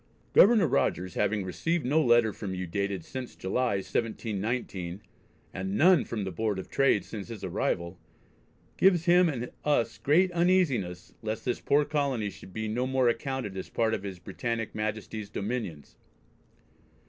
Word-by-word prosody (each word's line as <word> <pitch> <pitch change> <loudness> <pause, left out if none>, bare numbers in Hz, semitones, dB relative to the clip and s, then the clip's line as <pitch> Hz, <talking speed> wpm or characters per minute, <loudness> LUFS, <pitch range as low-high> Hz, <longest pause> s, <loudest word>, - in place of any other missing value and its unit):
"Governor 215 -2 +7
Rogers 90 - 0
having 105 0 0
received 165 - -1
no 150 +5 +3
letter 120 -3 +4
from 95 -2 -5
you 90 0 -3
dated 100 -1 -2
since 130 -2 -7
July, 120 +4 0
1719, 100 -3 -3 0.5
and 95 +1 -3
none 175 - +5
from 110 -3 -3
the 95 - -3
Board 105 +3 -1
of 95 - -7
Trade 135 -7 +3
since 105 -4 -7
his 115 -4 -8
arrival, 85 -1 -2 0.8
gives 180 -3 +4
him 175 0 +5
and 125 -4 -4
us 120 -6 +1
great 160 +10 +3
uneasiness 170 - +1
least 110 0 -4
this 125 - -1
poor 145 +1 +3
colony 140 -9 -1
should 95 - -13
be 110 +3 -3
no 120 +4 -1
more 130 -2 +3
accounted 130 -5 -3
as 95 - -6
part 110 -1 +1
of 100 - -1
His 100 -2 -6
Britannick 115 +5 -4
Majesty's 110 0 -4
dominions." 100 - -4
110 Hz, 155 wpm, -28 LUFS, 100-135 Hz, 0.8 s, Governor